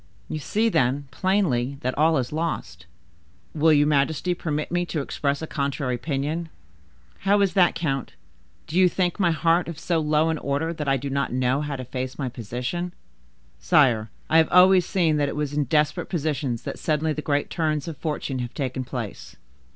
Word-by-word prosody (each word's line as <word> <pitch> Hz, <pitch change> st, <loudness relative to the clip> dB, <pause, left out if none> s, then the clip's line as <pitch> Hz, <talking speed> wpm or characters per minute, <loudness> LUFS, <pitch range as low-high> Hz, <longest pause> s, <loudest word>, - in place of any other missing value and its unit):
You 155 Hz, -, -3 dB
see, 215 Hz, +9 st, 0 dB
then, 140 Hz, -, +1 dB
plainly, 140 Hz, -10 st, 0 dB
that 130 Hz, +1 st, -2 dB
all 160 Hz, +1 st, +3 dB
is 125 Hz, +1 st, -2 dB
lost." 90 Hz, -, -3 dB, 0.7 s
"Will 160 Hz, +1 st, +4 dB
your 145 Hz, -1 st, +5 dB
majesty 150 Hz, +4 st, +1 dB
permit 155 Hz, -3 st, -3 dB
me 175 Hz, 0 st, +1 dB
to 160 Hz, -, -2 dB
express 140 Hz, +1 st, -2 dB
a -, -, -1 dB
contrary 140 Hz, -3 st, -2 dB
opinion?" 150 Hz, +5 st, -2 dB, 0.7 s
"How 200 Hz, +2 st, +3 dB
is 195 Hz, -2 st, +2 dB
that, 180 Hz, -4 st, +4 dB
count? 140 Hz, -6 st, -2 dB, 0.5 s
Do 165 Hz, -, -4 dB
you 185 Hz, -1 st, +6 dB
think 180 Hz, +1 st, -1 dB
my 180 Hz, -3 st, +3 dB
heart 165 Hz, +2 st, +2 dB
of 170 Hz, -3 st, -6 dB
so 170 Hz, +1 st, 0 dB
low 155 Hz, +1 st, +2 dB
an 160 Hz, -1 st, -1 dB
order 145 Hz, +4 st, -1 dB
that 150 Hz, -3 st, -5 dB
I 135 Hz, 0 st, +3 dB
do 140 Hz, +2 st, -5 dB
not 140 Hz, +1 st, -1 dB
know 130 Hz, +2 st, +1 dB
how 150 Hz, -1 st, -3 dB
to 130 Hz, -1 st, -6 dB
face 130 Hz, 0 st, -5 dB
my 135 Hz, -3 st, -2 dB
position?" 125 Hz, +10 st, -4 dB, 0.7 s
"Sire, 110 Hz, -, +3 dB, 0.2 s
I 160 Hz, +1 st, +5 dB
have 160 Hz, -, +3 dB
always 185 Hz, 0 st, +6 dB
seen 165 Hz, -5 st, +2 dB
that 145 Hz, -1 st, +1 dB
it -, -, -5 dB
was 150 Hz, -1 st, -2 dB
in 145 Hz, -1 st, +1 dB
desperate 150 Hz, +3 st, +1 dB
positions 145 Hz, -8 st, -2 dB
that -, -, -6 dB
suddenly 155 Hz, 0 st, 0 dB
the 150 Hz, -, -4 dB
great 145 Hz, -1 st, -1 dB
turns 155 Hz, -3 st, -1 dB
of 165 Hz, -, -5 dB
fortune 150 Hz, -4 st, -3 dB
have 120 Hz, -1 st, -5 dB
taken 130 Hz, -2 st, -2 dB
place." 120 Hz, -5 st, -6 dB
150 Hz, 190 wpm, -24 LUFS, 135-165 Hz, 0.7 s, you